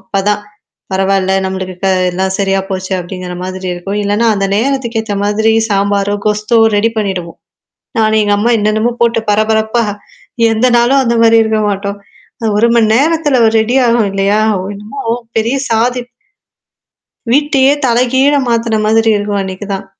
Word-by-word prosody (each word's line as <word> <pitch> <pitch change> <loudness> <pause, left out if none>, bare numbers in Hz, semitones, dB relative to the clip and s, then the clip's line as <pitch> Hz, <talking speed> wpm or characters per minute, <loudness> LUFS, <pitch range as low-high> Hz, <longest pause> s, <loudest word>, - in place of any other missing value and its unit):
அப்பதான். 200 +1 -1 0.5
பரவால்ல. 190 0 +1
நம்மளுக்கு 190 -1 -4
க - - +3 0.2
எல்லாம் 190 +1 -2
சரியா 195 -1 +1
போச்சு 190 0 -4
அப்படிங்கிற 180 0 -7
மாரி 185 0 -5
இருக்கும். 195 +4 -4
இல்லன்னா 205 +3 0
அந்த 195 -1 -1
நேரத்துக்கு 245 -1 -1
ஏத்த 210 -2 -4
மாதிரி 220 +2 +1 0.2
சாம்பாரோ, 200 0 0
கொஸ்தோ 210 +2 0 0.2
ரெடி 220 +3 +2
பண்ணிடுவோம். 185 -5 -4 0.6
நான 220 0 +2
எங்க 205 -1 +1
அம்மா 230 +3 +1
என்னென்னமோ 215 +3 0
போட்டு 230 -1 +2
பரபரப்பா, 220 +2 +1 0.7
எந்த 225 +3 +1
நாளும் 265 +3 +3
அந்த 235 0 +1
மாரி 230 0 +5
இருக்க 220 0 0
மாட்டோம். 200 0 -4 0.5
அ - - +1
1 235 +2 +3
மணி 230 -2 +4
நேரத்தல 295 -2 +1
ஒரு 220 - +2
ரெடி 240 +4 0
ஆகும் 230 -3 +2
இல்லையா, 195 +2 +1 0.4
என்னமோ 210 +7 -9 0.4
பெரிய 230 +5 0
சாதிப் 245 +2 0 1.2
வீட்டயே 280 -2 +3 0.2
தலைகீழ 255 +4 +2
மாத்துன 230 -2 0
மாதிரி 225 +1 +2
இருக்கும் 205 -1 -2
அன்னைக்கு 190 +1 -6
தான். 195 - -6
215 Hz, 145 wpm, -13 LUFS, 195-235 Hz, 1.2 s, மாரி